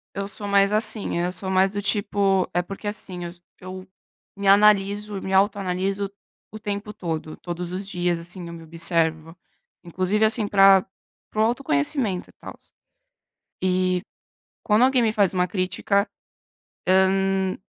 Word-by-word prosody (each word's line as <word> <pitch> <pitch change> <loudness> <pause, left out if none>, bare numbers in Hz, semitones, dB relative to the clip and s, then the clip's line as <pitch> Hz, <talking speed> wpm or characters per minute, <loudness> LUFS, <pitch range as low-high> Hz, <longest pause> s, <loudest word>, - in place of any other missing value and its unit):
Eu 200 0 -3
sou 205 +1 -6
mais 200 0 +3
assim 215 -4 +1
eu 175 +1 -1
sou 190 +1 -6
mais 190 +1 +3
do 205 0 -3
tipo 200 -2 +1
eh, 175 - +2
porque 195 +3 -8
assim 185 -4 -5
eu 170 - -6 0.3
eu 185 +1 -9 0.5
me 200 0 -3
analiso 205 0 +3
me 190 - -4
autoanaliso 195 0 0 0.4
o 215 - -9
tempo 210 0 -5
todo. 160 -4 -5
Todos 175 0 -6
os 190 +2 -4
dias, 175 -2 -1
assim, 175 +1 -8
eu 170 - -8
me 165 - -10
observo. 165 0 0 0.5
Inclusive, 185 +5 -1
assim, 220 -1 +2
pra 195 -2 +6 0.4
pro 215 - -1
autoconhecimento 220 - 0
e - - -19
tals. - - -13 0.9
E 185 -1 +1 0.6
quando 215 +1 +3
alguém 260 -2 +2
me 225 - +2
faz 200 -4 +2
uma 180 -1 +1
crítica, 190 +3 0 1.1
hã, 195 -1 0
195 Hz, 145 wpm, -23 LUFS, 180-205 Hz, 1.1 s, pra